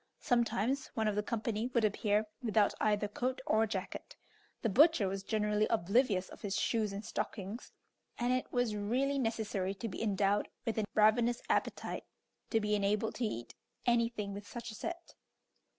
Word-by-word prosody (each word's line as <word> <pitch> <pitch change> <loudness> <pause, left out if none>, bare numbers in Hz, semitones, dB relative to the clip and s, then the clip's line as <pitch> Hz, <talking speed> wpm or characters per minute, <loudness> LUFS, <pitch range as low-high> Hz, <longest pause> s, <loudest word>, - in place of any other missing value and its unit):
Sometimes 245 +2 +1
one 220 -1 +1
of 210 - +2
the 210 - +2
company 225 +1 -2
would 235 -3 +2
appear 210 +1 +1 0.2
without 215 -4 +3
either 210 -1 +2
coat 250 +5 -2
or 220 +1 +3
jacket; 195 -3 -5 0.5
the - - +3
butcher 265 - +5
was 195 +1 -3
generally 210 0 +1
oblivious 205 -1 +2
of - - -12
his 200 -3 -2
shoes 220 -3 +1
and 200 +2 -6
stockings; 205 +3 -4 0.5
and 245 +1 +1
it 255 - -1
was 245 -3 +1
really 255 +7 0
necessary 215 -5 -1
to 230 +4 -4
be 200 - -6
endowed 205 -1 +2 0.2
with 225 -2 0
a 215 - +1
ravenous 230 +3 +4
appetite - - -1 0.4
to 225 - +3
be 210 -1 0
enabled 210 +2 +1
to 240 - -1
eat 120 - -4 0.3
anything 230 -4 +1
with 200 0 -8
such 235 -2 -6
a - - -9
set. 345 +10 -6
215 Hz, 165 wpm, -33 LUFS, 205-235 Hz, 0.5 s, butcher